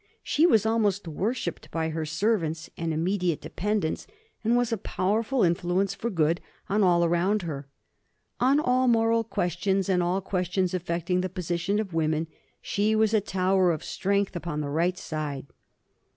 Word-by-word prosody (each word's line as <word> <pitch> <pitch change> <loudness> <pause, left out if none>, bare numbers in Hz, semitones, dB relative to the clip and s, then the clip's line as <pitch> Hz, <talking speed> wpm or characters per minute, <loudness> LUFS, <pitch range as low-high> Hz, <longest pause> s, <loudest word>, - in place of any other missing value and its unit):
She 320 +4 +3
was 220 - +4
almost 210 -4 +1
worshipped 185 - -3
by 160 -1 -1
her 160 0 -3
servants 165 -2 -1
and 165 -1 -2
immediate 175 +1 0
dependents, 205 -4 -2 0.4
and 230 +2 +3
was 245 -1 +1
a - - 0
powerful 215 +6 0
influence 175 +3 +1
for 210 +4 -3
good 165 -3 +1 0.3
on 205 +2 +1
all 175 -3 +4
around 180 +4 +1
her. 145 -4 -5 0.7
On 270 +4 +4
all 255 -2 +2
moral 230 -1 +3
questions, 190 -1 -1
and 180 -2 +3
all 175 +2 +1
questions 185 -1 -1
affecting 180 0 -1
the 185 - -2
position 180 +2 -1
of 200 -5 -4
women, 160 0 +1 0.4
she 210 +2 +1
was 220 0 +3
a 215 - +4
tower 190 -1 +2
of 155 - -3
strength 200 0 -1
upon 170 -3 -3
the 145 - -3
right 175 +4 +1
side. 150 -5 -4
185 Hz, 160 wpm, -27 LUFS, 170-210 Hz, 0.7 s, was